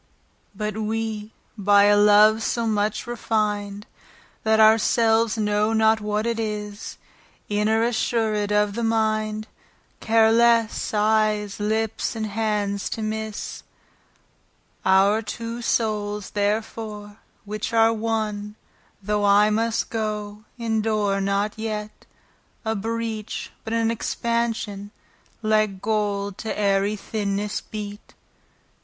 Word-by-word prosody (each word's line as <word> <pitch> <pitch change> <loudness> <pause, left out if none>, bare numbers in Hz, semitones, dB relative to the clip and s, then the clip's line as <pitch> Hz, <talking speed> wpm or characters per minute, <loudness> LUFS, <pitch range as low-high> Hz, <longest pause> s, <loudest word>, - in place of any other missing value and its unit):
But 210 0 -3
we 220 0 -3 0.2
by 200 -1 +4
a 205 0 +5
love, 210 +1 +6
so 235 +1 -1
much 215 -1 0
refin'd, 210 -3 -2 0.6
That 220 0 +2
our 220 +1 +7
selves 225 0 +2
know 210 0 +1
not 220 0 +3
what 210 +1 -1
it 235 -1 -1
is, 210 -1 -5 0.5
Inter 215 +2 +2
assured 220 -3 0
of 210 -1 +2
the 235 +2 -3
mind, 215 -1 0 0.5
Care 225 0 +4
lesse, 230 -1 +3
eyes, 210 -1 +1
lips, 220 +2 -1
and 220 -1 -2
hands 205 -2 -1
to 220 - -4
misse. 220 0 -4 1.2
Our 195 +3 +4
two 230 +2 -5
soules 210 -3 -1
therefore, 210 0 -3 0.3
which 215 +2 -4
are 225 0 +4
one, 215 -2 -2 0.5
Though 210 +1 0
I 205 +1 +5
must 225 +1 0
goe, 210 -1 -4
endure 215 -3 0
not 200 +2 0
yet 215 -1 -5 0.6
A 220 0 0
breach, 225 0 -4
but 220 - -6
an 230 0 +1
expansion, 230 -3 -2 0.5
Like 215 -2 +1
gold 205 -2 -1
to 225 - -6
ayery 200 0 +2
thinnesse 205 0 -3
beate. 205 -1 -8
215 Hz, 110 wpm, -23 LUFS, 205-225 Hz, 1.2 s, our